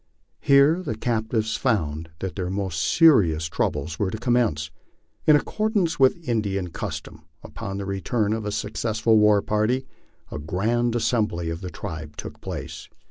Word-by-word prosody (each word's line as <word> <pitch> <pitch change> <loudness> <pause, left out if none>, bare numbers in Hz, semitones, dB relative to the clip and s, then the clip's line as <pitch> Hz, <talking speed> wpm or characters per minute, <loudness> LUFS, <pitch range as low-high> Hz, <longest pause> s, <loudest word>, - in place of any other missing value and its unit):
Here 140 +5 +5
the 115 -11 -3
captives 110 -1 -1
found 80 - -1
that 95 -4 -4
their 90 -2 -3
most 95 -4 -2
serious 95 - +4
troubles 80 0 -2
were 100 - +1
to 110 - -4
commence. 110 - +1 0.6
In 155 - +8
accordance 200 0 0
with 135 +5 +3
Indian 100 -6 -1
custom, - - -6 0.2
upon 100 -1 -6
the 100 - -4
return 100 +2 -1
of 110 0 -3
a 105 - -3
successful 110 +1 +1
war 105 -1 +4
party, 110 +5 0 0.5
a - - -5
grand 115 +10 0
assembly 110 -8 0
of 85 +2 -5
the 90 - -5
tribe 80 -2 -7
took - - -8
place. - - -7
105 Hz, 150 wpm, -24 LUFS, 90-120 Hz, 0.6 s, In